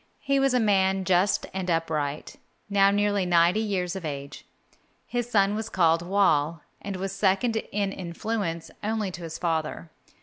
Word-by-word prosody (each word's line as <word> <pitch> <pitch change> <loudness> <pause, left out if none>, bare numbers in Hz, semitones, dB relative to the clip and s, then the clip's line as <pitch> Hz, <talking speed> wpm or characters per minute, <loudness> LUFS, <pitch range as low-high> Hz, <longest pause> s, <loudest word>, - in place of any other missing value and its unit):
He 275 -1 +1
was 270 -1 +2
a - - +4
man 195 -3 +2
just 185 +2 +2
and 185 -1 -3
upright, 155 -3 -2 0.3
now 195 0 +5
nearly 205 -1 +1
ninety 175 +2 +3
years 195 -4 -1
of 190 - -6
age. 140 -2 -6 0.6
His 240 -1 -3
son 200 -3 +3
was 220 +1 -3
called 165 -4 +3
Whal, 170 -4 +2 0.2
and 200 -1 -5
was 190 +1 -3
second 195 +4 +1
in 200 -1 -1
influence 170 -2 -4
only 215 -2 -1
to 175 - -8
his 165 -1 -6
father. 160 -1 -2
190 Hz, 160 wpm, -26 LUFS, 170-205 Hz, 0.6 s, now